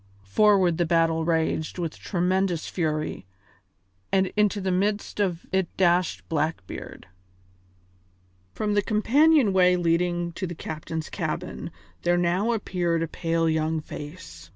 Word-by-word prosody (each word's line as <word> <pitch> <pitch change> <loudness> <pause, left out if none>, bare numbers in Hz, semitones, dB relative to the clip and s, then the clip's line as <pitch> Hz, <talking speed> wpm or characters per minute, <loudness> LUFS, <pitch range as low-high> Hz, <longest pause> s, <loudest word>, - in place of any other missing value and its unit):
Forward 185 - +3
the 175 - +3
battle 165 -1 +2
raged 160 -1 0
with 170 -3 -3
tremendous 180 -2 0
fury, 155 - -2 0.8
and 190 -1 +2
into 210 -1 +2
the 190 -1 -1
midst 205 +3 -1
of 180 -4 -1
it 190 -2 +1
dashed 180 -1 +2
Blackbeard. 155 - -4 1.5
From 210 -1 -1
the 205 - +3
companion 245 +3 +3
way 180 -1 +5
leading 175 0 0
to 185 +2 -4
the 175 - -6
captain's 160 +1 -5
cabin - - -4 0.3
there 175 0 +2
now 180 +6 +1
appeared 175 -6 0
a - - -2
pale 165 +1 -1
young 160 0 0
face. 145 - -9
175 Hz, 130 wpm, -25 LUFS, 160-190 Hz, 1.5 s, way